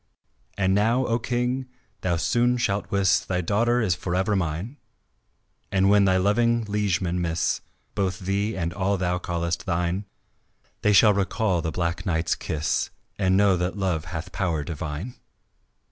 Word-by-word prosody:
And 95 -1 +2
now, 115 +6 +2
O 115 0 +1
King, 125 +2 -1 0.3
thou 90 -2 +1
soon 120 +7 +2
shalt 100 -4 -1
wis 100 -2 +3
Thy 90 -1 -2
daughter 115 +7 +2
is 100 -6 +2
forever 95 +4 -1
mine, 95 - -2 0.9
And 95 0 +3
when 100 -1 +5
thy 95 -1 +3
loving 115 +5 +2
liegemen 95 -4 0
miss 85 -1 0 0.3
Both 95 -2 -1
thee 100 +3 -1
and 85 -1 -2
all 100 +1 0
thou 90 -1 0
callest 85 0 -3
thine, 90 +3 -1 0.8
They 105 - +3
shall 105 +1 +6
recall 100 -2 0
the 80 - -2
Black 85 +2 -2
Knight's 80 -3 0
kiss 80 0 -1 0.3
And 95 -1 +3
know 100 -1 +4
that 90 +3 -2
love 90 -5 -1
hath 85 +2 -6
power 85 -6 -1
divine." 80 - -5
95 Hz, 150 wpm, -25 LUFS, 85-105 Hz, 0.9 s, shall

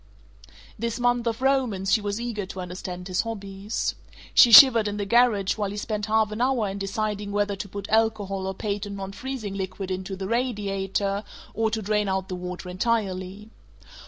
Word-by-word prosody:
This 235 +1 -2
month 245 -1 +1
of 230 +2 -2
romance 245 -8 +1
she 220 - +4
was 205 +1 -3
eager 225 -5 -4
to 190 - -8
understand 180 0 -6
his 185 -1 0
hobbies. 200 -1 -4 0.4
She 240 - +7
shivered 230 -3 +9
in 205 0 -3
the 205 - -2
garage 225 -3 +3
while 205 -2 -1
he 205 - -6
spent 210 0 -3
half 220 0 +2
an 215 +2 -4
hour 250 -4 +1
in 195 +1 -5
deciding 205 0 -3
whether 205 0 0
to 200 - -6
put 200 +1 -6
alcohol 210 -3 0
or 190 - -3
patent 205 0 -4
non 195 -1 -6
freezing 235 -2 -5
liquid 190 0 -5
into 190 +1 -4
the 190 0 -5
radiator, 200 -4 -1 0.3
or 225 +1 +1
to 220 0 -3
drain 210 0 0
out 190 0 -2
the 185 - -3
water 180 0 -6
entirely. 195 0 -2
205 Hz, 185 wpm, -25 LUFS, 195-225 Hz, 0.4 s, shivered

